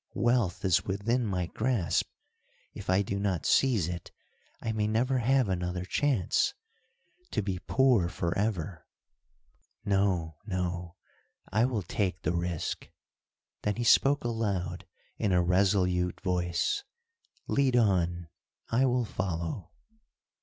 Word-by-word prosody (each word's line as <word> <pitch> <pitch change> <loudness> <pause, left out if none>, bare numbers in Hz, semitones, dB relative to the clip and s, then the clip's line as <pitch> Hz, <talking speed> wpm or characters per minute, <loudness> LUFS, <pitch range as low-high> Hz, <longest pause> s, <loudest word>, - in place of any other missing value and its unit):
"Wealth 120 -7 +1
is 95 -3 +3
within 110 +5 0
my 90 -3 -1
grasp; 110 -1 0 0.6
if - - -8
I 95 +2 +4
do 100 0 -3
not 95 -6 -1
seize 115 - +3
it, 90 -1 -5 0.5
I 115 - -2
may 105 -1 0
never 125 +4 +1
have 130 0 +3
another 90 -1 -2
chance! 125 - +1 0.7
To - - -1
be 95 -2 -2
poor 125 -6 +3
forever! 85 -2 -2 1.0
No! 95 -6 +1
no! 90 -2 -3 0.6
I 110 +4 +3
will 120 -6 -1
take 95 +1 -2
the - - 0
risk." 85 -1 -3 0.7
Then 105 -1 0
he 120 - -2
spoke 140 +4 +4
aloud, 100 -7 -2 0.3
in 100 - +1
a 90 -1 +4
resolute 90 -1 +2
voice, 90 - 0 0.6
"Lead 135 -3 +2
on, 90 -7 +2 0.4
I 130 +3 +3
will 125 -1 +1
follow." 90 -2 -3
95 Hz, 120 wpm, -29 LUFS, 90-115 Hz, 1.0 s, I